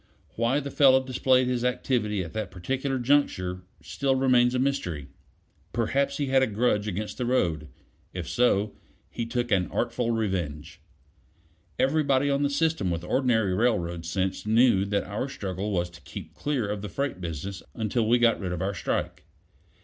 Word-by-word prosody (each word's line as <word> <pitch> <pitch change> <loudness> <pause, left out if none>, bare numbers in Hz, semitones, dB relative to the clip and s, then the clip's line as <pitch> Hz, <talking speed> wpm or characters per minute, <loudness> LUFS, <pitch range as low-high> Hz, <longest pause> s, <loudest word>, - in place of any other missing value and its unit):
Why 120 +5 +1
the 140 -1 -6
fellow 130 -2 +5
displayed 130 0 +3
his 125 -1 -1
activity 115 -5 0
at 85 - -9
that 110 -3 -3
particular 130 +10 -2
juncture 120 -9 +1 0.2
still 135 -1 0
remains 125 -2 +3
a - - +2
mystery. 90 - -1 0.6
Perhaps 140 +4 0
he 145 - 0
had 135 0 +3
a 130 - +3
grudge 105 -1 +1
against 105 +4 -4
the 125 - 0
road; 85 -11 +1 0.4
if - - -5
so, 105 -4 +2 0.4
he 115 - -4
took 120 0 -2
an 95 -3 +3
artful 120 0 -1
revenge. 95 -12 -2 1.0
Everybody 140 -1 +2
on 140 0 +1
the 145 - +2
system 145 - +1
with 85 -1 -2
ordinary 110 -2 +1
railroad 90 -6 0
sense 95 +2 -1
knew 110 -2 +4
that 100 0 0
our 105 +7 -4
struggle 100 -5 -4
was 90 -3 0
to 85 - -14
keep - - -9
clear 140 -7 -1
of 105 0 -4
freight 135 -7 -3
business 85 +3 -5
until 110 0 0
we 120 - +5
got 120 -1 +3
rid 95 -3 -3
of 90 - -3
our 100 +1 -1
strike. 90 - -3
115 Hz, 165 wpm, -27 LUFS, 95-130 Hz, 1.0 s, fellow